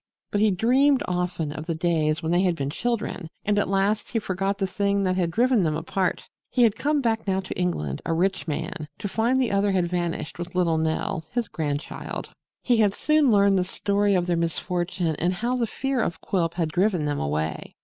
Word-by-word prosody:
But 205 Hz, -, +1 dB
he 215 Hz, -, +5 dB
dreamed 255 Hz, +8 st, +3 dB
often 180 Hz, -4 st, -1 dB
of 155 Hz, +2 st, -7 dB
the 165 Hz, -, -1 dB
days 160 Hz, -2 st, +1 dB
when 160 Hz, -, -1 dB
they 175 Hz, +1 st, +3 dB
had 180 Hz, -3 st, +2 dB
been 140 Hz, -2 st, -3 dB
children 220 Hz, -3 st, -2 dB, 0.2 s
and 205 Hz, 0 st, +2 dB
at 205 Hz, -, 0 dB
last 200 Hz, +2 st, +1 dB
he -, -, -1 dB
forgot 195 Hz, -1 st, -1 dB
the 195 Hz, -, 0 dB
thing 200 Hz, +1 st, 0 dB
that 185 Hz, -1 st, +1 dB
had 180 Hz, -2 st, +1 dB
driven 240 Hz, +5 st, +3 dB
them 155 Hz, -3 st, +1 dB
apart. 180 Hz, +3 st, -1 dB, 0.2 s
He 250 Hz, -, +3 dB
had 225 Hz, -3 st, +4 dB
come 295 Hz, +3 st, +1 dB
back 225 Hz, -3 st, 0 dB
now 190 Hz, 0 st, +1 dB
to 190 Hz, -, -6 dB
England, 75 Hz, -, -2 dB
a -, -, -2 dB
rich 175 Hz, -1 st, 0 dB
man, 150 Hz, 0 st, -4 dB
to -, -, -4 dB
find 230 Hz, +6 st, +1 dB
the 250 Hz, -5 st, +1 dB
other 200 Hz, 0 st, +2 dB
had 180 Hz, -2 st, +2 dB
vanished 175 Hz, -2 st, -3 dB
with 175 Hz, +1 st, -6 dB
little 170 Hz, -3 st, +2 dB
Nell, 160 Hz, 0 st, -1 dB
his 240 Hz, -3 st, 0 dB
grandchild. 145 Hz, -2 st, -4 dB, 0.3 s
He 245 Hz, -2 st, +3 dB
had 205 Hz, -3 st, +3 dB
soon 305 Hz, -3 st, +3 dB
learned 200 Hz, -2 st, +4 dB
the -, -, +2 dB
story 200 Hz, +2 st, +1 dB
of 180 Hz, -1 st, +1 dB
their 175 Hz, -1 st, +1 dB
misfortune 175 Hz, 0 st, -1 dB
and 175 Hz, +2 st, +1 dB
how 235 Hz, +7 st, -1 dB
the 240 Hz, -2 st, 0 dB
fear 270 Hz, +2 st, -1 dB
of 165 Hz, -6 st, -2 dB
Quilp 170 Hz, -4 st, -1 dB
had 165 Hz, -3 st, 0 dB
driven 180 Hz, -1 st, +1 dB
them 145 Hz, -1 st, -1 dB
away. 75 Hz, +2 st, -3 dB
185 Hz, 215 wpm, -25 LUFS, 165-210 Hz, 0.3 s, he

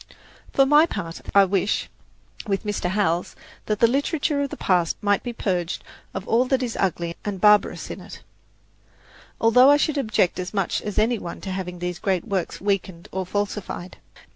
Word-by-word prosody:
For 270 Hz, -, +4 dB
my 295 Hz, +4 st, +6 dB
part, 165 Hz, -, -5 dB
I 200 Hz, -1 st, +8 dB
wish, 195 Hz, +1 st, 0 dB, 0.6 s
with 195 Hz, -1 st, -1 dB
Mr. 205 Hz, -4 st, -2 dB
Howells, 180 Hz, -3 st, 0 dB, 0.3 s
that 210 Hz, -1 st, 0 dB
the -, -, +8 dB
literature 285 Hz, +3 st, 0 dB
of 280 Hz, -, -1 dB
the -, -, -7 dB
past 175 Hz, -3 st, +1 dB
might 205 Hz, -1 st, +1 dB
be 245 Hz, -, -4 dB
purged 180 Hz, -6 st, -2 dB, 0.3 s
of -, -, -5 dB
all 240 Hz, +3 st, +3 dB
that 260 Hz, 0 st, +1 dB
is 235 Hz, -2 st, -3 dB
ugly 170 Hz, -2 st, -1 dB
and 205 Hz, -2 st, -4 dB
barbarous 210 Hz, +1 st, +3 dB
in -, -, -7 dB
it, -, -, -11 dB, 1.2 s
although 250 Hz, +4 st, +6 dB
I 290 Hz, -, +7 dB
should 295 Hz, 0 st, 0 dB
object 215 Hz, -9 st, +1 dB
as 185 Hz, +3 st, -5 dB
much 195 Hz, -3 st, 0 dB
as 210 Hz, -, -5 dB
any 225 Hz, +2 st, +2 dB
one 170 Hz, -, -7 dB
to 190 Hz, -, -5 dB
having 180 Hz, -1 st, -4 dB
these 180 Hz, 0 st, -4 dB
great 190 Hz, -3 st, 0 dB
works 190 Hz, -3 st, -2 dB
weakened 190 Hz, -3 st, -2 dB
or 190 Hz, -1 st, -3 dB
falsified. 205 Hz, -2 st, -4 dB
200 Hz, 180 wpm, -23 LUFS, 180-235 Hz, 1.2 s, I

